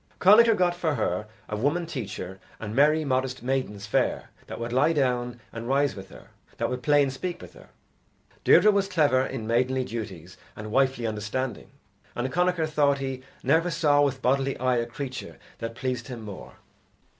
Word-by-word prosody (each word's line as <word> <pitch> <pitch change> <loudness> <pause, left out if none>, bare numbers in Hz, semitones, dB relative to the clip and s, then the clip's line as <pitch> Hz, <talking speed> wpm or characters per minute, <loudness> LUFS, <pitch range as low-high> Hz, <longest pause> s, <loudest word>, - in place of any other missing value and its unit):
Connachar 220 +4 +7
got 180 -1 +3
for 165 -4 -1
her 105 -2 -1 0.2
a 105 - -3
woman 145 +10 0
teacher 100 - -6 0.2
and 105 0 -5
merry 150 +3 +4
modest 130 -2 -1
maidens 125 -6 -2
fair 105 - 0 0.2
that - - -7
would 115 +1 -4
lie 135 +6 +3
down 125 -4 0
and 115 0 -6
rise 140 +1 +2
with 95 -1 -10
her, - - -14 0.3
that - - -1
would 125 0 -3
play 145 +1 +4
and 135 -1 -2
speak 175 +6 -4
with - - -12
her. - - -16 0.7
Deirdre 215 - +6
was 200 -1 +1
clever 150 -9 +3
in 130 -4 -4
maidenly 130 +3 +1
duties 95 -8 -7 0.2
and 110 0 -7
wifely 130 -1 +2
understanding, 110 +4 -3 0.5
and 130 +2 -3
Connachar 180 -2 +2
thought 145 -2 +2
he 135 -1 -4 0.2
never 160 +6 +3
saw 145 -3 +3
with 135 -2 0
bodily 135 +1 +1
eye 130 -1 +1
a 115 0 -1
creature 130 +1 -6 0.2
that 115 0 -5
pleased 130 +2 -3
him 120 -4 -7
more. 100 -3 -9
130 Hz, 180 wpm, -26 LUFS, 115-145 Hz, 0.7 s, Connachar